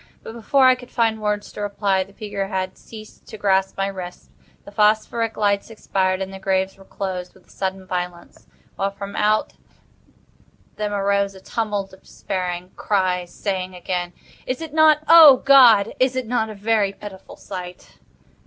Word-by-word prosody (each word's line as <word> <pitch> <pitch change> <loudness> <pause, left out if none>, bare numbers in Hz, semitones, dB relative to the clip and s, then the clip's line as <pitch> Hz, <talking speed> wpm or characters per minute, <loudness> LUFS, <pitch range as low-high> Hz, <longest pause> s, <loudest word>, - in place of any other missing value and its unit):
But, - - -8
before 260 +4 +2
I 255 - +7
could 250 -1 -10
find 225 -2 0
words 210 -1 -2
to - - -8
reply, 200 -2 0
the 195 - -19
figure 200 -1 -5
had 190 -1 -3
ceased 215 -1 -14
to 220 - -9
grasp 195 -2 +1
my 195 - 0
wrist, 185 -2 -8 0.3
the - - -11
phosphoric 220 +2 +1
lights 200 0 0
expired, 190 -3 -1
and 190 0 -8
the 190 - -8
graves 190 0 -1
were 195 - -17
closed 185 -2 -5
with 190 - -22
a - - -30
sudden 190 0 -4
violence, 180 -1 -6 0.3
while 195 - 0
from 200 0 -8
out 215 +1 +1 1.2
them 210 -1 -2
arose 200 -1 0
a - - -12
tumult 205 -2 -3
of 190 - -16
despairing 180 -1 -5
cries, 185 -3 -1
saying 185 -2 -4
again: 180 0 -4 0.3
"Is 255 - -2
it 320 -2 -8
not—O, 310 -2 +7
God, 245 -7 +6
is 255 0 +2
it 255 -1 -2
not 225 -1 -1
a 215 - -8
very 205 -1 +1
pitiful 195 -1 -11
sight?" 180 -2 -9
200 Hz, 170 wpm, -21 LUFS, 190-220 Hz, 1.2 s, I